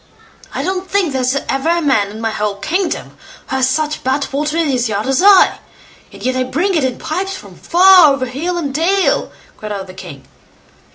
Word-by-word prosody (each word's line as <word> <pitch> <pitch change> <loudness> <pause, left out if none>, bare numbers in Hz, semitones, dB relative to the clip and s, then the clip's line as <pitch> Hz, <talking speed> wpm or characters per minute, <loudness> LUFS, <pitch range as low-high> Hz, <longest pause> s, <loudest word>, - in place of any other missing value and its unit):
"I - - -4
don't 375 0 -3
think 380 -7 0
there's 260 0 0
ever 270 +4 -1
a 340 0 +2
man 265 -11 +1
in 215 +2 -9
my 225 -1 -1
whole 210 -1 -2
kingdom 355 - -3 0.3
who 265 - -1
has 260 0 +2
such 305 +2 -2
bad 270 +2 -1
water 300 +3 -1
in 330 -2 +1
his 250 -4 0
yard 205 0 -2
as 265 +2 +1
I, 395 -1 +5 0.5
and - - -13
yet 255 0 0
I 255 - 0
bring 340 +10 -1
it 315 -5 +1
in 255 -2 -1
pipes 380 +5 -4
from - - -13
far, 360 -3 +6
over 275 -2 -1
hill 315 +8 -3
and 285 -5 -3
dale", 365 +6 +1 0.3
cried 215 0 -7
out 200 -2 -5
the 185 - -12
king. 140 -7 -11
280 Hz, 210 wpm, -16 LUFS, 255-345 Hz, 0.5 s, far